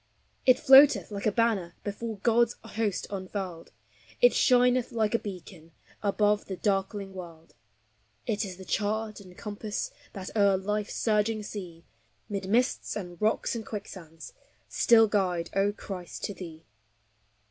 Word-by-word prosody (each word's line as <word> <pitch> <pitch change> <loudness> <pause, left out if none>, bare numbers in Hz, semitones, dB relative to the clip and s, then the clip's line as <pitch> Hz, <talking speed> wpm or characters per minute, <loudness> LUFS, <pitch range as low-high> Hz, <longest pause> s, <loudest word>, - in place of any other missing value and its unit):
It 255 -1 +7
floateth 275 -3 +7
like 200 +1 -2
a - - +3
banner 205 -6 0
Before 215 +2 -4
God's 235 0 +3
host 220 -3 -2
unfurled; 185 -3 -5 0.5
It 245 - +6
shineth 250 0 +3
like 220 -2 0
a 230 - +3
beacon 180 -4 -9 0.3
Above 210 0 +1
the 190 - -6
darkling 195 0 -1
world; 165 -3 -10 0.7
It 210 0 -1
is 185 -3 -6
the 190 - -10
chart 215 +2 -1
and 185 -3 -14
compass 210 0 -4 0.2
That 195 0 -8
o'er 200 -2 +4
life's 210 +2 -3
surging 215 0 +1
sea, 180 -5 -8 0.4
Mid 195 -2 -4
mists 245 +4 +1
and 175 -4 -7
rocks 215 +1 +1
and 230 -2 -4
quicksands, 185 -7 -9 0.3
Still 225 -1 +5
guide, 180 -5 0
O 195 +1 +3
Christ, 190 -4 -8
to 205 - -2
thee. 165 -4 -10
205 Hz, 140 wpm, -28 LUFS, 185-220 Hz, 0.7 s, It